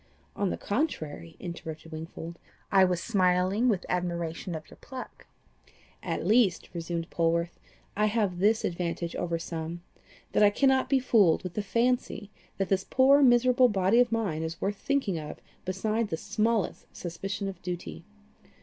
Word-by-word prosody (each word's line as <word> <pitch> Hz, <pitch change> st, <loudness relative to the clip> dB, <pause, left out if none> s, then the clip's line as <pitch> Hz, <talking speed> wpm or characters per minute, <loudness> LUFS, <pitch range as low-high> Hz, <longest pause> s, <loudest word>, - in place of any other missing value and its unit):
"On 200 Hz, -2 st, 0 dB
the -, -, -2 dB
contrary," 155 Hz, -, -3 dB
interrupted 165 Hz, -2 st, -7 dB
Wingfold, 165 Hz, +1 st, -7 dB, 0.3 s
"I 195 Hz, -1 st, +6 dB
was 180 Hz, -2 st, +1 dB
smiling 190 Hz, +3 st, +2 dB
with 195 Hz, -5 st, 0 dB
admiration 170 Hz, -1 st, -2 dB
of 155 Hz, -1 st, -7 dB
your -, -, -15 dB
pluck." 260 Hz, -1 st, -10 dB, 0.7 s
"At -, -, -3 dB
least," 215 Hz, -6 st, +3 dB
resumed 170 Hz, -1 st, -3 dB
Polwarth, 170 Hz, +1 st, 0 dB, 0.4 s
"I 210 Hz, +1 st, +3 dB
have 205 Hz, -5 st, 0 dB
this 215 Hz, +3 st, +3 dB
advantage 170 Hz, -1 st, -3 dB
over 170 Hz, -1 st, -1 dB
some, 165 Hz, +1 st, -5 dB, 0.5 s
that -, -, +2 dB
I 205 Hz, -, +8 dB
cannot 265 Hz, +4 st, +2 dB
be 275 Hz, -, +4 dB
fooled 210 Hz, -10 st, +4 dB
with 180 Hz, -2 st, -5 dB
the 210 Hz, -, -1 dB
fancy 220 Hz, 0 st, 0 dB, 0.3 s
that 195 Hz, -1 st, -1 dB
this 190 Hz, -1 st, +2 dB
poor 275 Hz, +2 st, +5 dB
miserable 250 Hz, 0 st, +5 dB
body 195 Hz, +2 st, +3 dB
of 245 Hz, -1 st, +4 dB
mine 205 Hz, -9 st, -1 dB
is 160 Hz, +1 st, -4 dB
worth 200 Hz, +2 st, -1 dB
thinking 265 Hz, -12 st, 0 dB
of 150 Hz, -1 st, -7 dB, 0.3 s
beside 215 Hz, +4 st, -1 dB
the 160 Hz, -, -3 dB
smallest 220 Hz, +4 st, -1 dB
suspicion 195 Hz, +4 st, -4 dB
of 190 Hz, -3 st, -7 dB
duty. 170 Hz, -, -6 dB
190 Hz, 155 wpm, -28 LUFS, 170-225 Hz, 0.7 s, I